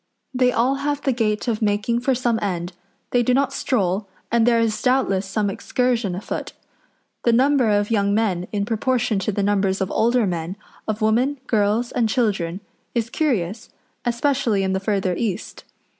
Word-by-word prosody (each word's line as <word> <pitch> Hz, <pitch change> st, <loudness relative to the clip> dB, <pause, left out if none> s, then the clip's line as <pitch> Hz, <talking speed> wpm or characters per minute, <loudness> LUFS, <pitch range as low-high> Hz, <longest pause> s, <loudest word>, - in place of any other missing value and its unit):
They 250 Hz, -1 st, +3 dB
all 250 Hz, +4 st, +1 dB
have 290 Hz, +1 st, -2 dB
the 270 Hz, -, +2 dB
gait 220 Hz, -2 st, -1 dB
of 225 Hz, -2 st, -1 dB
making 210 Hz, +3 st, +1 dB
for 260 Hz, +1 st, +2 dB
some 240 Hz, -2 st, 0 dB
end; 180 Hz, -3 st, -2 dB, 0.4 s
they 245 Hz, -, +3 dB
do 250 Hz, +1 st, +2 dB
not 275 Hz, 0 st, +1 dB
stroll, 195 Hz, -4 st, 0 dB, 0.2 s
and 235 Hz, 0 st, +3 dB
there 235 Hz, -1 st, +4 dB
is 225 Hz, -2 st, 0 dB
doubtless 245 Hz, -7 st, +1 dB
some 210 Hz, +1 st, 0 dB
excursion 235 Hz, -1 st, 0 dB
afoot. 190 Hz, -, -5 dB, 0.7 s
The 235 Hz, -, +4 dB
number 260 Hz, 0 st, +3 dB
of 205 Hz, +1 st, +1 dB
young 200 Hz, -2 st, +2 dB
men, 190 Hz, -5 st, 0 dB
in 200 Hz, -1 st, -1 dB
proportion 230 Hz, -1 st, 0 dB
to 195 Hz, +2 st, -1 dB
the 200 Hz, 0 st, -1 dB
numbers 195 Hz, -1 st, +1 dB
of 190 Hz, 0 st, -2 dB
older 235 Hz, +1 st, +2 dB
men, 175 Hz, -1 st, -3 dB, 0.3 s
of 215 Hz, 0 st, -2 dB
women, 245 Hz, +6 st, +2 dB
girls, 220 Hz, +2 st, +1 dB
and 230 Hz, -3 st, +1 dB
children, 200 Hz, -7 st, 0 dB, 0.3 s
is 230 Hz, 0 st, -1 dB
curious, 220 Hz, -, -1 dB, 0.3 s
especially 240 Hz, -4 st, +1 dB
in 190 Hz, 0 st, 0 dB
the 190 Hz, -, 0 dB
further 195 Hz, -2 st, 0 dB
east. 210 Hz, -2 st, -4 dB
220 Hz, 175 wpm, -22 LUFS, 200-245 Hz, 0.7 s, there